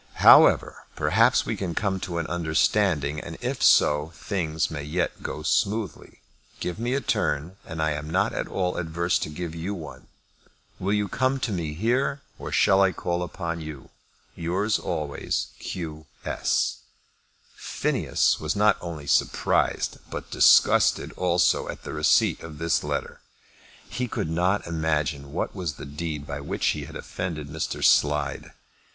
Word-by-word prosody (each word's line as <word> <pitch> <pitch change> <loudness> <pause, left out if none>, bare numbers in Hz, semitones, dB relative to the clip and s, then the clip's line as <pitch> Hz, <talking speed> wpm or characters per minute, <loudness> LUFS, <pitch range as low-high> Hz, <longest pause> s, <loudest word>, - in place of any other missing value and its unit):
However, - - +6
perhaps - - +3
we - - -2
can 90 -4 -4
come 100 -2 0
to 90 -2 -4
an 85 - -1
understanding, 80 -2 +1
and - - -8
if - - -3
so, 75 +2 +4
things 80 -7 -2
may 75 -2 -4
yet 75 +5 -2
go 75 - -5
smoothly. 105 +5 -1 0.4
Give 90 +3 -4
me 120 +3 0
a 140 - 0
turn 80 - -1
and 80 - -6
I 80 - +1
am 75 +1 -4
not 95 +6 +1
at - - -3
all 90 -1 -2
adverse 85 +1 0
to - - -3
give 80 +1 -5
you 85 +5 -4
one. 80 -5 -10 0.7
Will 95 +2 -1
you 105 -1 +1
come 130 +4 0
to 115 - -1
me 80 -5 -3
here, 130 - 0 0.2
or - - -6
shall 95 0 +4
I 95 -1 +4
call 85 0 -2
upon 85 -1 -4
you? 75 -3 -9 0.4
Yours 95 +6 0
always, 75 -2 -3
Q. 80 -3 -6 0.2
S. - - 0 0.8
Phineas - - 0
was 75 -1 -2
not 105 0 +4
only 80 -4 -6
surprised, 70 - +1
but - - -7
disgusted - - +5
also, 90 -1 +2
at - - -7
the - - -6
receipt - - +3
of 80 -2 -9
this 85 +1 0
letter. - - -4 0.7
He 125 +1 -3
could 80 - -3
not 90 +5 +1
imagine 75 -4 -1
what 80 - -2
was 90 -6 -3
the - - -9
deed 75 0 -5
by 70 0 -5
which 70 - -3
he - - -2
had - - -11
offended 80 -5 -5
Mr. 80 +2 -3
Slide. 75 -1 +2
85 Hz, 160 wpm, -25 LUFS, 75-95 Hz, 0.8 s, However